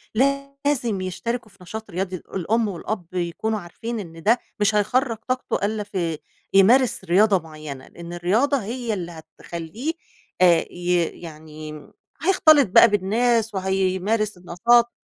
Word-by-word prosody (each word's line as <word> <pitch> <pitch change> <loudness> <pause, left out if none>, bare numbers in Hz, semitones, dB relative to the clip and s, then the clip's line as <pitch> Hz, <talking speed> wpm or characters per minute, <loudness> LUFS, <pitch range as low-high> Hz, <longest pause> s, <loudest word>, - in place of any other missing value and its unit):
لازم 275 -4 0
يشتركوا 225 +5 -4
في - - -23
نشاط 220 +4 -7
رياضي، 185 +1 -2
الأم 210 +6 -1
والأب 195 0 -4
يكونوا 185 +5 -2
عارفين 225 +6 -6
إن 165 -4 -9
ده 235 +3 +4 0.2
مش 210 +1 +2
هيخرّج 230 +3 +1
طاقته 255 -5 -1
إلّا 210 0 -2
في 175 -6 -3 0.4
يمارس 225 +3 +5
رياضة 195 +2 +4
معيّنة. 155 -5 -9
إن 170 0 -10
الرياضة 215 +12 +2
هي 235 +2 -3
اللي 175 -4 -4
هتخلّيه 170 - -6 0.5
آآ 175 -2 +5
ي 175 -1 +1 0.2
يعني 155 -2 -9 0.5
هيختلط 310 - +5
بقى 230 - +8
بالناس، 220 +2 +1
وهيمارس 190 +2 0
النشاط، 235 +7 +3
205 Hz, 125 wpm, -23 LUFS, 175-235 Hz, 0.5 s, بقى